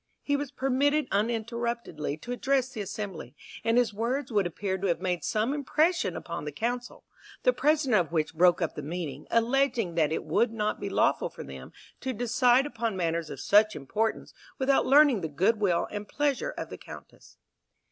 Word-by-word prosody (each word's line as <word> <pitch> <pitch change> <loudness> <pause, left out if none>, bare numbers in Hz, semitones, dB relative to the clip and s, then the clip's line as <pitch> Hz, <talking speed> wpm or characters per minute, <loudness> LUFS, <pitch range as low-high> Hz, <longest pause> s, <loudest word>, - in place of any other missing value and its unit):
He 285 - +1
was 285 -1 -2
permitted 280 +3 +1
uninterruptedly 225 - -2
to 245 - -7
address 260 +1 +1
the 225 -5 -6
assembly, 195 - -6 0.3
and 230 +1 +2
his 240 -4 +2
words 245 +5 -2
would 205 -4 +2
appear 190 +2 -3
to 195 - -1
have 170 -2 +1
made 180 -1 -2
some 220 +5 0
impression 300 - +1
upon 170 -3 -6
the 150 - -4
council, 240 +9 -4 0.4
the - - +4
president 270 - +2
of - - -22
which 160 -1 0
broke 175 +2 +4
up 165 - -2
the - - -6
meeting, 150 -2 -5
alleging 230 -4 +1
that 160 -2 +2
it - - -2
would 215 +9 +1
not 215 -1 -2
be - - -4
lawful - - +2
for - - -9
them 65 -1 -10 0.3
to 260 0 -3
decide 245 +3 +3
upon 230 -7 -3
matters 165 -2 -1
of - - -7
such 210 +1 +4
importance 215 +11 -2 0.2
without 270 0 +2
learning 275 -5 +6
the 160 - -2
good 190 +9 +1
will 185 -5 +1
and 205 0 -5
pleasure 290 - 0
of - - -6
the - - -7
Countess. - - -13
220 Hz, 185 wpm, -28 LUFS, 175-260 Hz, 0.4 s, learning